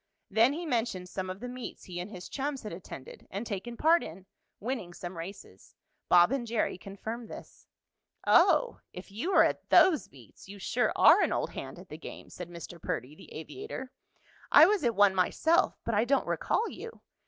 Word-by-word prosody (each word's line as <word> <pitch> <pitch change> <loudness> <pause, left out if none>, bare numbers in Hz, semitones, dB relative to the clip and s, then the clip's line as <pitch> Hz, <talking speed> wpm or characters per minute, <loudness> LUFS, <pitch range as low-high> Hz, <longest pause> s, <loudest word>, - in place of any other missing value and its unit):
Then 225 +6 +4
he 340 +3 -5
mentioned 225 - -1
some 185 0 -4
of 185 +2 -6
the 250 - -5
meets 250 0 -7
he 175 -1 -7
and 180 +3 -5
his 185 -4 -9
chums 275 -1 -3
had 210 - -6
attended 170 -6 -10
and 200 +4 -4
taken 230 +3 -5
part 330 +5 +4
in, 180 +4 -9 0.3
winning 215 -7 -4
some 175 0 -7
races. 100 - -10 0.3
Bob 175 +4 +6
and 265 -3 -1
Jerry 230 -1 0
confirmed 220 +5 -7
this. - - -12 0.6
"Oh, - - +4
if 180 +2 -10
you 235 - -3
were - - +7
at - - -1
those 350 -6 +5
meets 130 - -16
you 200 - -9
sure 245 +5 0
are - - +7
an - - +2
old - - -1
hand - - -7
at - - -13
the - - -8
game!" - - -10
said 180 -1 -8
Mr. 170 0 -9
Perdy, 125 +5 -4
the - - -15
aviator. 265 - -7 0.6
"I 300 - +9
was 405 -1 +2
at 235 -3 +1
one 205 -1 +5
myself, 315 - +2
but 230 - -1
I 210 +1 +3
don't 275 +3 +2
recall 455 - 0
you. 460 +1 -9
210 Hz, 195 wpm, -30 LUFS, 180-260 Hz, 0.6 s, I